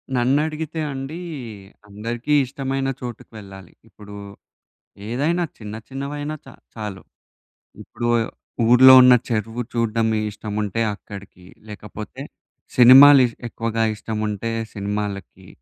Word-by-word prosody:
నన్ను 125 +3 +2
అడిగితే 160 +1 -5
అండి, 135 +5 -6 0.7
అందరికీ 115 +7 -4
ఇష్టమైన 135 0 -3
చోటుకి 120 -2 -8
వెళ్ళాలి. 95 -3 -13 0.2
ఇప్పుడు 105 -1 -13 0.9
ఏదైనా 155 +8 0
చిన్న 105 -1 -8
చిన్నవైనా 145 +3 -5
చ - - -17 0.3
చాలు. 105 -4 -6 0.8
ఇప్పుడు 120 - -5 0.6
ఊర్లో 130 +2 +8
ఉన్న 125 0 +7 0.2
చెరువు 115 +1 -2
చూడ్డం 115 -1 0 0.2
ఇష్టముంటే 105 +1 -4
అక్కడికి. 100 -3 -13 0.2
లేకపోతే 105 -4 -9 0.6
సినిమాలు 135 +3 +9
ఇష్ 115 - -11
ఎక్కువగా 115 0 -2
ఇష్టముంటే 110 0 -4 0.2
సినిమాలకి. 100 -2 -5
115 Hz, 100 wpm, -21 LUFS, 105-135 Hz, 0.9 s, సినిమాలు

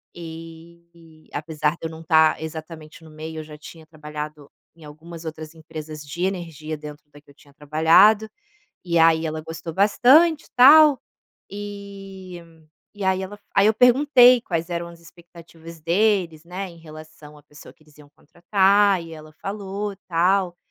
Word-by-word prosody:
e 165 0 -13
apesar 150 0 -2
de 170 - -16
eu 165 - -4
não 160 0 -11
estar 160 -1 +3
exatamente 160 0 -9
no 160 - -15
meio, 155 +1 -8
eu - - -6
já 155 -1 -12
tinha 160 +1 -14
trabalhado 150 -1 -9 0.3
em 165 -2 -16
algumas 165 +3 -12
outras 155 0 -8
empresas 155 -1 -10
de 170 +5 -6
energia 165 -5 -4
dentro 150 0 -11
da 145 - -16
que 150 - -28
eu - - -17
tinha 140 -2 -22
trabalhado, 165 +9 +3 0.6
e 170 -2 0
aí 165 0 +4
ela 155 0 -4
gostou 165 +1 -8
bastante 270 - +4
e - - -23
tal, 290 +2 +7 0.5
e 195 -3 -9 0.5
e 205 -2 -7
aí 190 0 0
ela 195 +2 -8
f 205 - -33
aí 195 - +4
eu 220 - +2
perguntei 250 +1 +5
quais 170 -6 -4
eram 170 -1 -4
as 170 0 -14
expectativas 170 -1 -15
deles, 175 -1 0
né, 185 +3 -6
em 170 - -16
relação 155 -1 -14
à - - -20
pessoa 150 +1 -15
que 155 - -28
eles 150 -1 -24
iam 145 -1 -17
contratar, 195 +4 +2
e 165 -1 -11
ela 155 -1 -12
falou, 200 0 -5
tal, 180 +1 +1
165 Hz, 170 wpm, -22 LUFS, 155-195 Hz, 0.6 s, tal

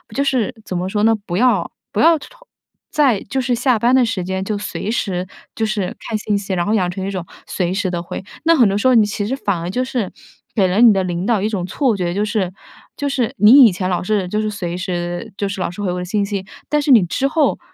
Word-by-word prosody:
就 280 - +1
是 255 -6 0
怎 185 - -3
么 180 +1 -2
说 210 +2 -1
呢， 225 +1 +5
不 175 - -4
要 250 +2 +2 0.2
不 - - -2
要 330 0 +6
同 - - -12 0.6
在 270 -9 +3
就 265 +6 -2
是 250 0 0
下 245 0 +2
班 240 +4 +2
的 260 -2 +5
时 225 -6 -2
间， 190 +1 -3
就 210 0 -2
随 205 0 -5
时 185 -5 -2 0.3
就 225 - 0
是 210 -4 -2
看 220 - -3
信 210 -1 -1
息， 200 -1 -4
然 175 -2 0
后 210 - 0
养 185 -5 +1
成 190 +1 -4
一 200 - -3
种 185 -3 -4 0.2
随 180 -1 -1
时 190 -1 -1
地 175 -1 -2
会。 175 - -7 0.2
那 330 0 +5
很 240 -8 +5
多 195 - 0
时 240 +5 +1
候 255 - +5
你 220 -2 +6
其 205 0 -3
实 260 - -1
反 200 -9 -2
而 170 +1 -4
就 250 +7 -1
是 250 -6 -3 0.4
给 195 -4 +3
了 185 +3 0
你 230 -3 +8
的 190 - +1
领 175 0 -3
导 220 -3 +1
一 215 - 0
种 190 -5 -2
错 230 +3 0
觉， 175 -2 -1
就 205 +3 0
是 205 -4 -1 0.4
就 285 - -2
是 260 -5 -1
你 240 +7 +8
以 220 - +5
前 185 +1 -2
老 180 - 0
是 195 -1 -1
就 210 - -1
是 215 0 -1
随 180 -4 -4
时 175 +3 -4
就 200 -1 -1
是 200 - -5
老 185 - -1
是 180 +4 -8
回 190 - -1
我 180 - -3
的 180 - -4
信 200 +2 0
息， 200 -2 -4 0.2
但 300 0 +2
是 290 - -3
你 220 -8 +7
之 265 +10 0
后， 300 -1 +1
205 Hz, 290 characters per minute, -19 LUFS, 185-235 Hz, 0.6 s, 你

